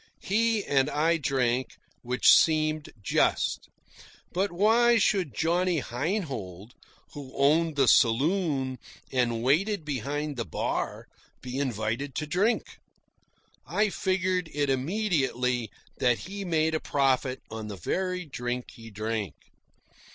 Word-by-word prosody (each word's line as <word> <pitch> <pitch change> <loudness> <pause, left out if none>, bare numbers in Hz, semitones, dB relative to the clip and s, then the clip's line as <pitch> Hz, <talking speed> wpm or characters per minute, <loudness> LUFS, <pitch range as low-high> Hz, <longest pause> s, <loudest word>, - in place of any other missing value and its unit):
He 220 +1 +1
and 135 0 +2
I 165 +3 +2
drank, 130 -3 0 0.3
which 125 +1 +4
seemed 155 -1 +3
just; - - +1 0.6
but 190 +2 0
why 230 +6 +4
should 185 - +1
Johnny 175 - +1
Heinhold, 125 - -4 0.4
who 140 -3 -9
owned 155 +3 +3
the 135 -3 +3
saloon 135 - +2 0.3
and 120 -3 0
waited 170 - +1
behind 145 +1 -3
the 115 - -1
bar, 85 - -3 0.4
be 125 +1 -4
invited 120 +1 -2
to 155 - -2
drink? 195 +10 0 0.9
I 215 0 +1
figured 185 -2 0
it 145 -1 0
immediately 130 - 0 0.3
that 125 -3 +3
he 195 - -7
made 160 -2 +1
a 155 - +1
profit 130 -3 0
on 110 -1 -6
the 100 -2 -7
very 180 - -2
drink 125 -3 -4
he 115 -1 -12
drank. 110 -5 -3
145 Hz, 120 wpm, -27 LUFS, 125-180 Hz, 0.9 s, which